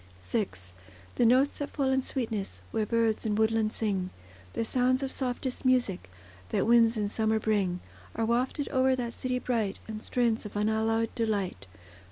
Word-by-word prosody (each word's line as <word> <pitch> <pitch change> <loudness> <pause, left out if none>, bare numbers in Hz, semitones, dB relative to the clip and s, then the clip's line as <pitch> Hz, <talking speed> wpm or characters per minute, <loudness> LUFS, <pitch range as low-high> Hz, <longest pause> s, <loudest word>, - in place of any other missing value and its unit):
VI 90 0 -1 0.7
The 235 - +3
notes 260 +4 +3
that 285 - -3
fall 270 -2 0
in 265 0 +3
sweetness, 220 - -3
Where 215 -1 0
birds 230 -1 +1
in 215 -2 0
woodland 220 0 +2
sing; 195 -5 -1 0.4
The 230 - -1
sounds 255 +3 +2
of 265 - -2
softest 255 0 -3
music, 245 - +1 0.4
That - - +1
winds 230 0 +5
in 210 -1 0
summer 220 +1 +1
bring, 200 -5 0 0.3
Are 225 - 0
wafted 250 +5 0
o'er 260 0 +3
that 240 -2 -3
city 255 +1 -2
bright, 230 -6 -1
In 220 -1 -5
strains 235 0 0
of 210 - -9
unalloyed 220 +2 +1
delight. 200 - -2
225 Hz, 165 wpm, -29 LUFS, 215-250 Hz, 0.7 s, winds